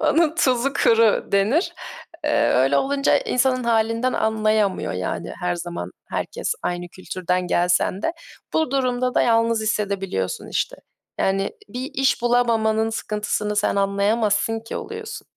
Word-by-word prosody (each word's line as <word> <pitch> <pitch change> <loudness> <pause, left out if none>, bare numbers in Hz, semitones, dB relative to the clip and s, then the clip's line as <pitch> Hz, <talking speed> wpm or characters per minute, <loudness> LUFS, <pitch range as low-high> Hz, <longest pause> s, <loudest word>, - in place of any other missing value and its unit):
onun 315 0 +3
tuzu 260 -4 +2
kuru 225 -2 +4
denir. 215 - +2 0.5
Eee, - - +2
öyle 135 +2 +3
olunca 275 - +2
insanın 260 - +1
halinden 230 +2 +1
anlayamıyor. 215 - +1
Yani, 90 -1 -4
her 180 0 0
zaman 170 - -5 0.2
herkes - - -2
aynı 175 0 -3
kültürden 180 0 -3
gelsen 180 +3 +1
de. 330 - 0 0.4
Bu 315 -4 +1
durumda 255 -2 0
da - - +4
yalnız 230 -1 +2
hissedebiliyorsun, 195 - -2
işte. - - -2 0.4
Yani, 195 0 +1 0.2
"Bir 255 +4 -5
iş 265 -2 +1
bulamamanın 225 -2 +2
sıkıntısını 210 -1 -2
sen 205 - +1
anlayamazsın 205 +2 +1
ki." 225 - -7
oluyorsun. 445 +1 -7
220 Hz, 130 wpm, -22 LUFS, 195-250 Hz, 0.5 s, kuru